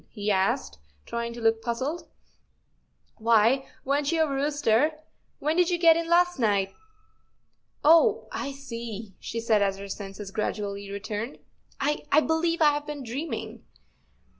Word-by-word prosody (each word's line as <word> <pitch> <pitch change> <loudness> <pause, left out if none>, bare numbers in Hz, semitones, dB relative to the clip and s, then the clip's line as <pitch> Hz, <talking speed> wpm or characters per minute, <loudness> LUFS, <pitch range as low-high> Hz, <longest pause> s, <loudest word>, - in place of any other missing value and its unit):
" - - -40
he 210 -1 -2
asked, 190 - 0 0.3
trying 235 0 -3
to 235 - -8
look 225 -1 +2
puzzled. 260 +9 -3 0.6
" - - -44
Why, 230 +4 +3 0.2
weren't 285 +2 +1
you 325 -1 +3
a - - 0
rooster? 285 -1 +1 0.4
When 305 +3 0
did 355 0 +3
you 350 - +1
get 335 -1 +6
in 335 0 -2
last 355 -1 +3
night? 200 -4 +1 1.1
Oh—I 330 -2 +3
see," 230 -6 -7
she 230 - -4
said, 225 -2 +2
as 195 -1 +1
her 200 0 -7
senses 195 0 -7
gradually 200 -1 -3
returned. 210 +5 -5 0.2
" - - -33
I—I—believe 320 +3 +1
I 300 - +7
have 295 0 -4
been 295 -2 -5
dreaming." 235 -3 -5
240 Hz, 145 wpm, -27 LUFS, 215-300 Hz, 1.1 s, I